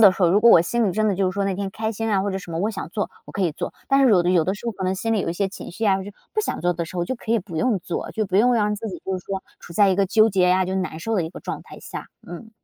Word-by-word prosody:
的 205 -4 +8
时 185 - -3
候， 175 - +6
如 195 - +5
果 235 - +8
我 170 - +8
心 230 +7 +1
里 190 - 0
真 215 +3 +1
的 200 - +1
就 185 0 +1
是 - - -9
说 200 0 0
那 195 - 0
天 195 +1 -3
开 220 +2 -3
心 225 0 -2
啊 195 - +3
或 200 +1 -1
者 190 - -2
什 180 -2 -10
么 165 - -3
我 205 +5 0
想 190 -6 -6
做， 205 +3 -2
我 - - -12
可 - - -4
以 175 -4 +1
做， - - -5 0.2
但 275 0 +4
是 255 - +5
有 185 -5 +5
的 175 - +1
有 175 -3 +3
的 190 - 0
时 210 - -9
候 230 - -1
可 195 -2 -5
能 185 +1 +1
心 225 +4 -1
里 215 - +1
有 165 - -2
一 - - -1
些 195 +3 -1
情 195 - -9
绪 225 - -3
呀， 195 -2 +4
就 200 - -8 0.2
不 430 - +1
想 - - -3
做 175 0 +1
的 170 0 -2
时 165 - -11
候 175 0 -1
就 - - -2
可 230 -2 -3
以 230 - +4
不 180 -5 -8
用 235 +1 +2
做。 170 0 -4
就 215 -1 -2
不 190 0 0
用 245 +5 +5
让 210 -3 +2
自 225 +2 -6
己 185 - -7
就 190 0 -2
是 180 - -15
说， 195 -1 -4 0.2
处 - - -11
在 200 +3 +4
一 190 - +2
个 200 - +3
纠 215 +3 +4
结 190 -3 +2
呀， 185 +1 +3
就 190 - -2
难 185 -4 -3
受 225 +6 -2
的 190 - +2
一 160 - -5
个 - - -10
状 - - -5
态 - - -12
下， - - -8 0.2
嗯。 175 +6 -9
195 Hz, 410 characters per minute, -23 LUFS, 180-220 Hz, 0.2 s, 的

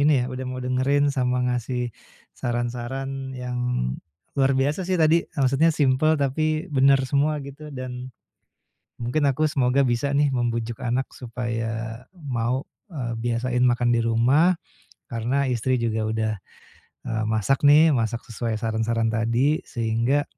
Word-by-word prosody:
ini 150 +1 +5
ya 125 - 0
udah 130 0 -5
mau 130 - -5
dengerin 135 +3 +1
sama 125 -2 +1
ngasih 125 -1 -2 0.4
saran-saran 125 +3 -3
yang 125 -1 -4 0.8
luar 135 -1 +2
biasa 145 +7 +1
sih 185 0 -1
tadi, 160 +1 +4 0.2
maksudnya 135 +4 +3
simpel 150 +1 +2
tapi 155 +3 0
bener 135 -1 +4
semua 145 +3 +1
gitu 150 +2 -10
dan, 130 -1 -6 0.9
mungkin 125 +5 0
aku 140 +3 +2
semoga 135 -2 +2
bisa 135 +2 +1
nih 145 +1 +3
membujuk 120 -2 -2
anak 125 +2 0
supaya 115 -1 -4
mau, 130 -6 -2 0.2
eee, 125 -7 -3
biasain 120 +2 0
makan 120 -1 +2
di 115 - +1
rumah, 125 +10 +4 0.5
karena 125 +5 -1
istri 125 0 0
juga 115 -2 -1
udah, 110 0 0 0.7
eee, 110 -1 -2
masak 110 +6 +2
nih 155 +2 +7
masak 115 -3 -1
sesuai 115 0 -2
saran-saran 115 +1 0
tadi, 115 +7 +1
sehingga 115 +5 0
125 Hz, 135 wpm, -24 LUFS, 115-140 Hz, 0.9 s, nih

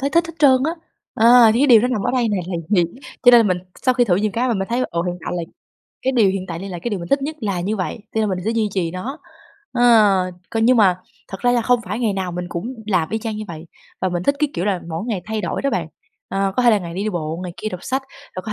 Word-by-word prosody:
thấy 280 +1 -1
thích 335 0 +2
hết 330 - -9
trơn 275 -3 +6
á, 320 - +1 0.4
ờ, 235 0 +7
thì 240 - +2
cái 290 - +4
điều 235 -5 +7
đó 245 - +1
nằm 250 -6 -1
ở - - 0
đây 250 -3 +1
nè 205 - 0
là 185 - -3
gì, 185 -4 +3 0.4
cho 245 - +8
nên 240 - +8
là - - +5
mình 185 -4 +1 0.2
sau 255 - +3
khi 245 - +3
thử 180 -6 +2
nhiều 210 +2 0
cái 250 +4 0
mà 235 - +1
mình 195 -1 -2
thấy 240 +2 0
là, 255 - 0
ừ, 170 -1 -1
hiện 175 0 -2
tại - - -3
là 170 - -2 0.6
cái 265 - +1
điều 225 -6 +4
hiện 190 -1 -4
tại 165 -1 -4
đây 195 - -7
là 180 -2 -6
cái 240 - -2
điều 205 - -2
mình 170 - -7
thích 275 0 +2
nhất 310 +2 -4
là 200 -6 -2
như 205 +5 -2
vậy, 185 +3 -3 0.2
cho 220 - +1
nên 215 - +1
mình 185 - -2
sẽ 220 - 0
duy 225 -2 0
trì 175 -4 0
nó. 230 - -6 0.5
Ờ, 245 - 0 0.7
còn 225 0 0
nhưng 250 +2 +5
mà 190 -5 +4 0.3
thật 190 - -8
ra 245 0 +3
là 240 -2 +2
không 245 0 +2
phải 210 +5 -4
ngày 225 -4 0
nào 190 -2 -3
mình 180 +1 -4
cũng 205 +10 -5
làm 180 -6 +1
y 220 - -1
chang 220 -1 -4
như 215 - -5
vậy, 160 -1 -8 0.4
và 185 - +1
mình 175 0 -2
thích 280 - +2
cái 300 0 +1
kiểu 175 - -2
là 195 -3 0
mỗi 165 +3 -4
ngày 210 -7 -2
thay 220 0 -3
đổi 175 +5 -3
đó 275 - +1
bạn! - - -1 0.4
Ờ, 195 0 -1
có 250 - +2
thể 240 - +6
là 215 - +4
ngày 170 -3 -7
này 190 - -3
đi 215 - 0
bộ, 165 -1 -4
ngày 180 -1 -5
kia 215 - -4
đọc 180 -4 -7
sách, 265 +1 -2 0.3
rồi 185 - -4
có 215 - -5
215 Hz, 315 wpm, -20 LUFS, 185-245 Hz, 0.7 s, cho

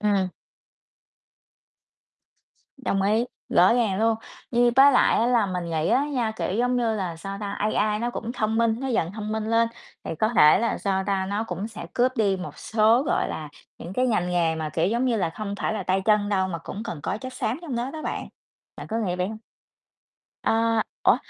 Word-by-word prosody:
Ừm. 200 -3 +2 2.5
Đồng 195 -7 -1
ý, 215 +4 +2 0.2
rõ 185 +6 +5
ràng 220 -6 +1
luôn, 225 0 +3 0.3
như 240 0 +4
với 275 +1 +8
lại 250 - +4
á, 230 - +2
là 240 -4 +3
mình 180 -3 -3
nghĩ 160 -1 0
á 255 +5 +3
nha, 245 -7 -1
kiểu, 185 - -2
giống 245 +1 +2
như 230 -2 +1
là, 185 -5 -3
sao 195 +4 -6
ta, 200 -1 -4
AI 210 0 0
nó 240 +2 -1
cũng 235 -1 -5
thông 220 -2 -1
minh 230 -1 +2
nó 270 - -3
dần 185 -8 0
thông 215 0 -5
minh 220 0 -2
lên 230 0 +3 0.4
thì - - -4
có 215 - +2
thể 155 -10 +6
là, 230 - 0
sao 190 -1 -1
ta, 195 -2 0
nó 205 +3 -2
cũng 195 0 -4
sẽ 230 - -8
cướp 250 +1 +2
đi 200 -3 +2
một 185 - -8
số, 225 +3 +3
gọi 295 - 0
là, 155 -1 -5 0.3
những 170 - -8
cái 255 +6 +1
ngành 195 -7 0
nghề 170 -2 +1
mà, 160 -1 -3
kiểu, 165 +2 +1
giống 235 +6 0
như 245 -3 +2
là, 180 -5 0
không 200 +3 -5
phải - - 0
là 215 -2 -3
tay 190 +1 0
chân 210 -1 +3
đâu, 190 -2 +1
mà 170 -2 -4
cũng 195 +5 -7
cần 160 - -5
có 195 - -2
chất 255 +2 -7
xám 250 0 -2
trong 290 -8 -4
đó 240 +3 -2
đó 310 +2 -7
bạn, - - -4 0.5
bạn - - -8
có 225 - -2
nghĩ 185 -5 -1
vậy 180 +1 -1
hông? 220 0 -7 1.1
Ơ, 225 0 +2 0.2
ủa, - - +5
215 Hz, 220 wpm, -25 LUFS, 190-235 Hz, 2.5 s, với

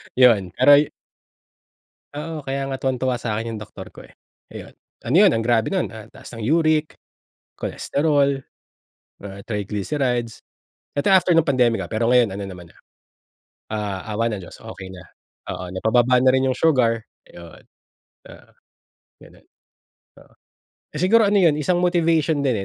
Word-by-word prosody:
Yun 110 -8 +4
pero 135 +3 +6
yu 150 - +1 1.3
Oo, 155 0 -6
kaya 135 0 -3
nga 135 - -3
tuwang-tuwa 130 -1 -1
sakin 115 -1 -4
yung - - -7
doktor 105 - -11
ko - - -14
eh, - - -17 0.4
ayun, - - -11 0.3
ano 135 - 0
yun 195 -2 +6
ang 115 - 0
grabe 115 +3 +1
nun 190 -2 0
ah, 110 +1 -12
taas 120 - -12
ng 115 - -7
uric, 155 +2 +1 0.6
cholesterol, 140 -2 0 0.9
ah, 100 0 -10
triglycerides. 115 +3 -3 0.5
Eto 145 +6 -1
after 185 -2 +4
nung 165 -3 +3
pandemic 125 -4 +2
ah, - - -6
pero 115 +2 0
ngayon 115 -6 +3
ano 100 - -5
naman 90 -3 -10
na, - - -23 1.0
ah, 105 -3 -3 0.2
awa 115 +1 +1
ng - - -2
Diyos 90 - -12
okey 100 -4 -10
na 90 - -11 0.5
oo 90 0 -6
napa-baba 120 +6 +2
na 130 - +3
rin 130 0 +2
yung - - +1
sugar 125 -8 +2 0.3
yun. 85 -1 -14 0.7
Oo, - - -15 0.7
ganun - - -18
oo. - - -43 1.4
Siguro 190 +8 +3
ano 205 - +1
yun, 165 -5 +4
isang 175 +4 0
motivation 165 -3 +1
din 130 -5 +1
125 Hz, 150 wpm, -21 LUFS, 110-150 Hz, 1.4 s, pero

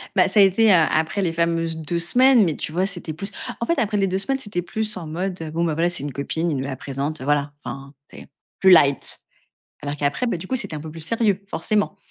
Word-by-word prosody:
Bah, - - +5
ça 210 - +4
a - - +9
été 205 +3 +4
a 165 -3 +5
après 160 +5 0
les 175 -4 0
fameuses 165 0 -1
2 160 +2 -2
semaines, 250 +7 +5
mais 165 -5 0
tu 155 - -4
vois, 180 +3 +1
c'était 175 -4 -5
plus 195 +6 -6 0.3
en - - 0
fait, 335 +4 0
après 215 -3 0
les 195 -1 +2
2 185 0 -1
semaines, 265 +8 -1
c'était 205 -8 -3
plus 215 +4 -3
en 170 -3 -7
mode, 180 +3 -4
heu: 160 -1 -5
«Bon, 165 +2 -1
voilà, 165 +1 +1
c'est 175 -5 -2
une 145 - -4
copine, 160 +5 -2
il 145 - -1
nous 130 - -2
la 135 -1 -4
présente, 140 +3 -4
heu, - - -5
voilà» 145 0 0
enfin, 135 0 -8 0.2
c'est, - - -11 0.3
plus 190 - +6
light. 140 -6 +4 0.6
Alors 145 0 -3
qu'après, 145 - 0
bah, 230 - -1
du 180 - -8
coup, 260 - -1
c'était 200 -9 -4
un - - -6
peu 155 +1 -8
plus 165 +1 -10
sérieux, 210 +3 +1
forcément. 210 -2 -1
170 Hz, 260 wpm, -22 LUFS, 155-200 Hz, 0.6 s, a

